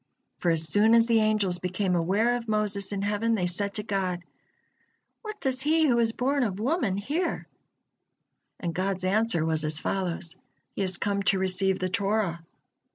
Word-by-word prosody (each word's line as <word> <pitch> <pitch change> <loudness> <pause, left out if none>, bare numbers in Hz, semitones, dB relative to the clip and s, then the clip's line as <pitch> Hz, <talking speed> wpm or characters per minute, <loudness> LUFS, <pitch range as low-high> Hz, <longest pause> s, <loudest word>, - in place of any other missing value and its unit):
For 175 - +1
as 165 -1 +2
soon 210 +8 +5
as 230 -1 +5
the 230 -1 +3
angels 210 -5 +1
became 185 +1 -1
aware 200 +8 +2
of 235 -1 -5
Moses 210 -2 -1
in 200 -1 -2
heaven, 210 +3 0
they 185 -4 0
said 200 +3 -2
to 210 - -3
God: 185 -4 -2 1.0
"What 430 -2 -7
does 260 -1 -1
he 315 +3 +3
who 240 -3 +3
is 225 -1 +2
born 275 +4 0
of 205 -5 -1
woman 240 - 0
here?" 290 - -2 1.1
And 170 -2 -3
God's 185 +1 -2
answer 195 -4 +2
was 160 -1 +1
as 155 0 +1
follows: 175 -2 -3 0.4
"He - - -4
has 185 -2 -1
come 200 -1 -1
to 195 - +2
receive 190 0 0
the 185 - -1
Torah." 195 -3 -1
200 Hz, 175 wpm, -27 LUFS, 185-225 Hz, 1.1 s, soon